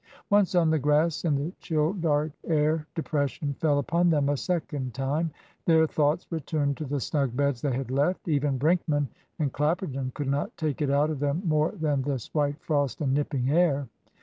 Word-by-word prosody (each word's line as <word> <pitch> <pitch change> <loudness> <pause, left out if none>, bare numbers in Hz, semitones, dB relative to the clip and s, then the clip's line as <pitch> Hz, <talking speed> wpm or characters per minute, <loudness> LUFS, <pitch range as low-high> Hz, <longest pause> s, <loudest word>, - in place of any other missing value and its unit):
Once 200 -2 +4
on 165 -3 +4
the 160 - +2
grass, 150 +4 +2
in 155 -4 +2
the 145 +6 -2
chill, 155 +1 0
dark 155 -5 0 0.2
air, 155 0 +1
depression 145 -2 -1
fell 150 -3 +2
upon 170 +5 +2
them 145 -3 +2
a 145 - +2
second 145 -6 -3
time. 145 +5 0 0.4
Their 160 -1 +5
thoughts 155 +2 +1
returned 145 -3 -1
to 155 - -4
the 145 +1 -2
snug 135 -1 -1
beds 140 -4 +1
they 140 -3 0
had 130 -1 -4
left. 145 +9 0
Even 145 -3 +1
Brinkman 150 -1 +1 0.3
and 145 -4 -1
Clapperton 145 -4 -1
could 145 - -3
not 140 +2 -1
take 155 -2 -2
it 145 - +1
out 145 +2 +2
of 150 - -4
them 145 +6 -1
more 155 +1 +2
than 150 -7 0
this 130 -3 -4
white 145 -1 0
frost 145 -4 0
and 135 -3 +1
nipping 140 -2 0
air. 150 -5 +2
150 Hz, 190 wpm, -27 LUFS, 140-160 Hz, 0.4 s, Their